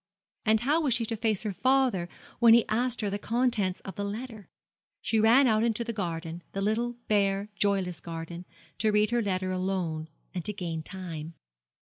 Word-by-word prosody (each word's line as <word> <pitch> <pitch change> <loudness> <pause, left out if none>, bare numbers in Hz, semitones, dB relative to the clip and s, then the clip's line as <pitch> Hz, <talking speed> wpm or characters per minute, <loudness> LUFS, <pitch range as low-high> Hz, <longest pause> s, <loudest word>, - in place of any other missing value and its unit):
And 220 0 +4
how 295 +7 +2
was 270 -7 +3
she 230 - +1
to 225 - -3
face 220 -2 0
her 210 -2 -2
father 255 -7 +2 0.3
when 230 -1 +8
he 235 - +3
asked 240 +2 0
her 205 -2 -1
the 205 - -2
contents 225 -5 0
of 195 - -9
the 200 - -2
letter? 215 0 -6 0.5
She 225 - +1
ran 235 +6 +6
out 220 -3 +3
into 235 0 +1
the 230 0 -4
garden 170 -4 -4
the 195 - -2
little 225 +4 0
bare, 200 -1 +1
joyless 195 -4 +1
garden 170 +1 -7 0.3
to 215 - +2
read 210 +1 +3
her 240 0 +2
letter 185 -3 -1
alone, 185 -4 -2 0.3
and 180 -3 -3
to 210 - -2
gain 170 -5 -4
time. 165 -2 -7
205 Hz, 185 wpm, -28 LUFS, 185-230 Hz, 0.5 s, when